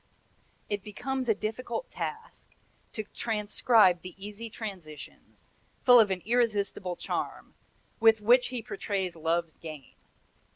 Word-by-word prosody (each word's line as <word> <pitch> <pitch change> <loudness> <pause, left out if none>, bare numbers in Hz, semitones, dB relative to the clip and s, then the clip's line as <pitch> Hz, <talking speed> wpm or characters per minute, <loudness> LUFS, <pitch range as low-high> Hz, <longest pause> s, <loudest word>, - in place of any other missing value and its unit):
"It 205 -1 -2
becomes 250 +5 -3
a 220 - +4
difficult 235 - -4
task 450 +1 -6 0.4
to 215 - -3
transcribe 210 -3 +3
the 185 -1 -9
easy 210 +3 -7
transitions, 180 -10 -9 0.3
full 245 -1 +8
of 215 -3 +5
an 185 -2 -2
irresistible 210 -5 +1
charm, - - -4 0.5
with 225 -1 +6
which 240 +4 +5
he 245 -2 -5
portrays 195 -4 -3
Love's 165 0 -1
game. 155 -5 -9
210 Hz, 120 wpm, -29 LUFS, 185-230 Hz, 0.5 s, full